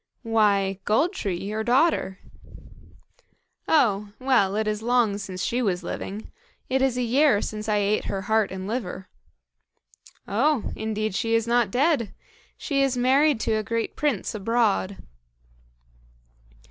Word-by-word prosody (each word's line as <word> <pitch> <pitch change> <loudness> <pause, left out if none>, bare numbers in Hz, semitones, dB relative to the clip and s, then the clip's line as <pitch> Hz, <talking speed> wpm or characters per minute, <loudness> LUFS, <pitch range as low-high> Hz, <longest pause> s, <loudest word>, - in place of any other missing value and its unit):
"Why, 200 -4 +2
Gold 295 - +2
tree, 195 - -3
your 210 +3 -3
daughter." 245 - +2 1.5
"Oh! 210 -9 +2
well, 245 -7 +2
it 215 0 -1
is 210 0 -2
long 230 -3 +1
since 185 -2 -5
she 245 +2 0
was 185 -5 -1
living. 200 +4 -6 0.4
It 265 +1 +1
is 265 -2 +1
a 250 - 0
year 260 -1 +3
since 215 +1 -5
I 210 - +2
ate 205 +1 0
her 195 -1 -3
heart 220 0 +1
and 190 0 -6
liver." 195 -5 -5 1.2
"Oh! 260 +5 +1
indeed 215 -1 -3
she 225 +4 0
is 230 -1 +1
not 235 -2 +2
dead. 260 - +1 0.4
She 280 -3 -1
is 270 -2 +1
married 270 +2 +3
to 220 - 0
a - - 0
great 230 +2 -3
prince 285 -10 -1
abroad." 215 -2 0
220 Hz, 140 wpm, -24 LUFS, 200-250 Hz, 1.5 s, year